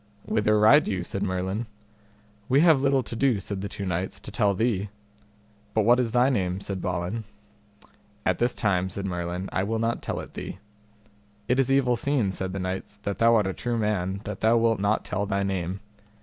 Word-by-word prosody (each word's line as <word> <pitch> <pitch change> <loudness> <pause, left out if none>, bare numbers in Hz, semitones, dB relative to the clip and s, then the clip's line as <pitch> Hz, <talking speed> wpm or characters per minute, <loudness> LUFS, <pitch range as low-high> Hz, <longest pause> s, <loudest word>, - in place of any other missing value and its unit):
Whither 105 0 +2
ride 130 +9 +6
you? 90 -3 -1
said 100 - -4
Merlin. 95 +3 -2 0.8
We 135 +3 +5
have 160 -5 +5
little 135 -1 +2
to 115 - -7
do, 125 -3 +2
said 95 0 -5
the 100 - -4
two 100 - -5
knights, 95 +2 -3
to - - -9
tell 105 -4 +2
thee. 105 -2 0 0.9
But 110 - +3
what 120 +2 +5
is 120 -2 +1
thy 125 +2 +3
name? 95 -6 0
said 100 -2 -4
Balin. 90 +5 -2 1.0
At 95 - +1
this 120 +1 +1
time, 95 -3 +1
said 100 +1 -4
Merlin, 90 0 -3
I - - +1
will 110 +4 -1
not 115 +1 -1
tell - - -3
it - - -9
thee. - - -6 0.9
It 125 +2 +2
is 135 0 +2
evil 130 -3 +3
seen, 120 -5 0
said 95 0 -4
the 95 - -4
knights, 95 +2 -4
that 100 -1 -3
thou 115 0 +5
art 105 -3 +3
a 95 - -1
true 120 +3 -2
man 100 -3 -1
that 105 -1 -6
thou 115 +2 +4
wilt 115 -2 +2
not 100 +2 +1
tell 100 +2 -2
thy 100 0 0
name. 95 -1 -2
105 Hz, 205 wpm, -26 LUFS, 95-115 Hz, 1.0 s, ride